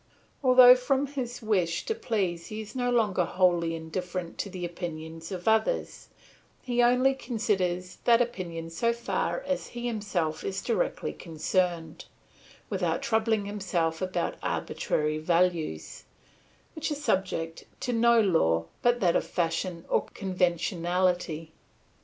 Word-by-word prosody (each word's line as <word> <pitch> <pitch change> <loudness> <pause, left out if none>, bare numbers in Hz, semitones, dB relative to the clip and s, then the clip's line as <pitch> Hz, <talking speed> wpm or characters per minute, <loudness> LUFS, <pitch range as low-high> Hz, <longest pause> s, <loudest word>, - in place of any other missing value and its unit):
Although 255 -1 +9
from 270 +2 +1
his 255 -4 -5
wish 185 -6 0
to 445 - 0
please 200 - -2
he 215 - -6
is 215 +3 -8
no 245 -1 0
longer 215 -7 +2
wholly 175 -2 +2
indifferent 175 +2 -5
to 200 - -2
the 180 -2 -5
opinion 165 -2 -6
of 185 0 -6
others, 220 - +1 0.6
he 245 -1 +1
only 250 +2 +4
considers 195 -8 -2
that 235 -1 +6
opinion 170 -9 -3
so 230 +8 +1
far 235 0 -2
as 280 -1 -2
he 240 - -4
himself 200 -9 -2
is 195 0 -3
directly - - -1
concerned, 170 0 -2 0.6
without 175 -5 -1
troubling 220 -2 +1
himself 180 -5 -1
about 185 -2 -2
arbitrary 155 0 -1
values, 170 - 0 0.7
which 315 0 -3
are 300 - -1
subject 185 - -1 0.2
to 250 - -1
no 235 0 +5
law 85 - +3 0.2
but 240 0 +2
that 175 -2 +3
of - - +1
fashion 170 0 -2
or - - +1
conventionality. 175 -2 0
185 Hz, 130 wpm, -28 LUFS, 170-235 Hz, 0.7 s, Although